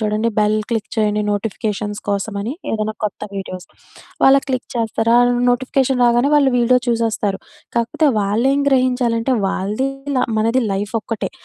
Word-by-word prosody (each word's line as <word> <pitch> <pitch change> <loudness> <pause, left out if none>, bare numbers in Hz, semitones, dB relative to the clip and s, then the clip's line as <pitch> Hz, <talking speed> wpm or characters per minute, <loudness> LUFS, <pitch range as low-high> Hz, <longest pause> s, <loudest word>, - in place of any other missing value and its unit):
చూడండి 215 +1 0
bell 210 0 +3
click 225 -2 -2
చేయండి 210 -1 +1
notifications 205 0 -3
కోసమని. 200 +3 -2 0.2
ఏదైనా 215 0 -2
కొత్త 210 - -3
వీడియోస్. 185 -2 -6 0.6
వాళ్ళ 270 +1 +7
క్లిక్ 255 -2 -2
చేస్తారా 230 0 +1 0.3
నోటిఫికేషన్ 260 +1 +1
రాగానే, 240 +3 +3
వాళ్ళు 275 -3 +3
వీడియో 250 +1 +4
చూసేస్తారు. 225 -4 0 0.4
కాకపోతే 235 +6 +1
వాళ్ళేం 235 +8 +1
గ్రహించాలంటే 255 -2 +1
వాళ్ళది 210 +8 -1 0.2
ఇలా 255 - +2
మనది 230 +4 +2
లైఫ్ 205 +3 -3
ఒక్కటే. 220 0 -4
225 Hz, 130 wpm, -19 LUFS, 210-250 Hz, 0.6 s, వాళ్ళ